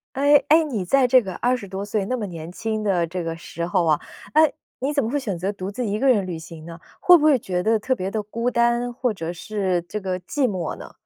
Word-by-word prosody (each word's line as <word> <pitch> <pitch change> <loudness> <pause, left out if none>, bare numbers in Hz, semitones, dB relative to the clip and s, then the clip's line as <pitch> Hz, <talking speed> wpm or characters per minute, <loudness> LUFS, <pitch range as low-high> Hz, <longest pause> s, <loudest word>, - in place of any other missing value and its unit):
诶 285 +2 +6
诶， 320 +2 +6
你 245 -11 -3
在 260 +8 +3
这 255 +1 +6
个 190 -5 -6
20 245 -4 -1
多 195 +1 -5
岁 205 -1 -1
那 255 +5 -2
么 220 - -3
年 165 -3 -7
轻 220 +3 -3
的 185 -5 +1
这 175 +2 -4
个 165 0 -3
时 170 0 -6
候 175 0 +1
啊， 155 -2 +3 0.3
诶， 310 0 +5 0.3
你 270 +3 -1
怎 285 - +1
么 225 - -2
会 290 - 0
选 205 -9 -3
择 190 +4 -2
独 195 -2 -6
自 240 +5 -3
一 210 0 -1
个 275 - +2
人 210 -7 +3
旅 175 -3 -5
行 160 -1 -11
呢？ 165 0 -9 0.2
会 360 - +7
不 305 - -2
会 305 -3 +5
觉 180 -6 -2
得 220 +4 +2
特 255 +5 0
别 190 -5 -3
地 215 +2 -2
孤 230 +4 -2
单， 240 0 +1
或 245 -1 -1
者 165 -4 -5
是 185 -1 -2
这 210 - -4
个 185 -1 -2
寂 260 +9 0
寞 180 -5 -3
呢？ - - -11
205 Hz, 275 characters per minute, -23 LUFS, 180-250 Hz, 0.3 s, 会